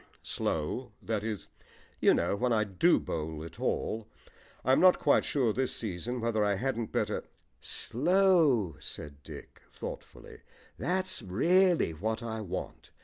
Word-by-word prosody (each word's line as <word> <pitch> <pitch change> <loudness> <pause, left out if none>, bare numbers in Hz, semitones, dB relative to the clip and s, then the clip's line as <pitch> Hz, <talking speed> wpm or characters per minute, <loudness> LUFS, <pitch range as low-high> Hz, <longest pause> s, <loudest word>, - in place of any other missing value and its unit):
"Slow 105 +10 -2
that 110 -2 -2
is, 110 -3 -4 0.5
you - - +5
know, - - +1
when 125 +4 0
I 110 -2 +3
do 95 -4 +3
bowl 80 -1 -4
at 80 0 -10
all. 110 0 -1 0.6
I'm 130 +2 +5
not 185 0 +7
quite 145 - +3
sure 125 -7 +1
this 130 +2 -1
season 115 +4 -3
whether 115 -2 +1
I 100 -1 +2
hadn't 120 0 -2
better - - -1 0.3
" - - -41 0.2
"Slow," 155 - +3
said 70 -2 -7
Dick - - -11
thoughtfully; - - -9 0.3
"that's 185 +1 -1
really 170 - +3
what 110 +8 -3
I 110 -1 -4
want. 100 - -6
110 Hz, 145 wpm, -30 LUFS, 95-135 Hz, 0.6 s, not